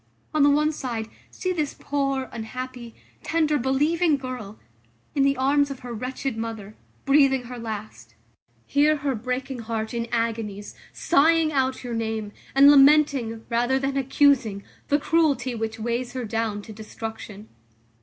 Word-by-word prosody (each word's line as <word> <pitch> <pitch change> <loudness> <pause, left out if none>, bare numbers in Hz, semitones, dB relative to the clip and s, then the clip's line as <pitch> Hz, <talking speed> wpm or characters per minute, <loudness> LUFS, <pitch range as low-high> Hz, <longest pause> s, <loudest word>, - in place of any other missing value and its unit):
On 310 - +2
the 285 - +6
one 300 +2 +3
side, 235 -7 -4 0.2
see 370 0 -3
this 305 -5 -2
poor, 275 -2 -1
unhappy, 240 +1 -7 0.3
tender, 310 -2 +1
believing 295 +5 +2
girl, 250 -6 -7 0.6
in 280 - +1
the 275 0 +3
arms 285 +2 +2
of 275 -2 -7
her 245 -1 -7
wretched 255 +2 -4
mother, 220 -2 -6 0.3
breathing 275 -2 +4
her 245 0 -8
last. 215 -2 -7 0.5
Hear 295 +2 +3
her 285 -2 -1
breaking 255 +3 -4
heart 225 0 -4
in 235 0 -2
agonies, 225 -3 -2 0.2
sighing 325 0 +3
out 260 -1 0
your 245 -1 -5
name; 220 -2 -3 0.2
and 280 +1 +8
lamenting, 275 -5 +4
rather 240 +2 +1
than 270 0 -2
accusing, 265 -6 +2 0.2
the 290 - +3
cruelty 285 -5 +1
which 225 -1 -4
weighs 240 +3 -2
her 255 -2 -4
down 220 -2 -2
to 220 - -10
destruction. 220 -1 -8
255 Hz, 145 wpm, -24 LUFS, 225-280 Hz, 0.6 s, and